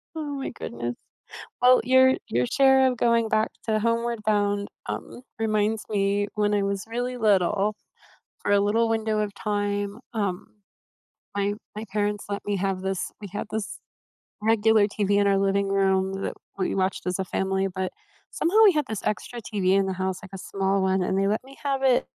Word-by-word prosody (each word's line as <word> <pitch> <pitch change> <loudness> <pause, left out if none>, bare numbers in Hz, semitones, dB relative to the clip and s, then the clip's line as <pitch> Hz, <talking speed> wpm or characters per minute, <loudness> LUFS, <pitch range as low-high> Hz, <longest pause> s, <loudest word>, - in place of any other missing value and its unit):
Oh, 315 - -3
my 270 - -3
goodness. 120 - -5 0.7
Well, 250 0 +7
your 260 +1 +6
your 125 +1 +1
share 265 - +5
of 250 - -4
going 230 -1 +2
back 215 0 +1 0.2
to 215 -1 +2
Homeward 230 +1 0
Bound, 205 -1 +1 0.2
um, 245 - -6 0.2
reminds 215 -1 0
me 205 0 +1
when 210 -1 +1
I 205 - +2
was 200 0 -2
really 245 +2 -3
little, 210 -1 +2 0.7
for - - -1
a 205 - +5
little 220 +3 +2
window 220 -1 0
of 210 -1 -2
time, 205 0 -2
um, 200 -5 -2 0.9
my 200 0 0 0.2
my 215 - -4
parents 205 0 -1
let 200 0 -3
me 205 -1 -1
have 190 -1 -1
this 190 -1 -2
we 205 - -7
had 205 - -4
this 220 -1 -4 0.6
regular 220 -1 +4
TV 205 -1 -1
in 205 - +3
our 195 -1 +3
living 195 0 +1
room 190 -1 +2
that - - -3 0.2
we 185 - 0
watched 190 -1 -1
as 180 +1 -1
a 190 - -1
family, 190 +1 -1
but 190 -1 -2 0.4
somehow 345 +6 0
we 405 - +7
had 300 -2 +1
this 220 -3 -4
extra 235 +3 -3
TV 200 -4 -1
in 195 0 +3
the 190 - -1
house, 185 0 -2
like 190 - -12
a - - -6
small 195 +1 -1
one, 190 0 +2
and 190 +1 0
they 195 - +2
let 215 +2 0
me 270 +1 -14
have 275 -1 0
it 260 -2 +4
205 Hz, 190 wpm, -25 LUFS, 195-225 Hz, 0.9 s, Well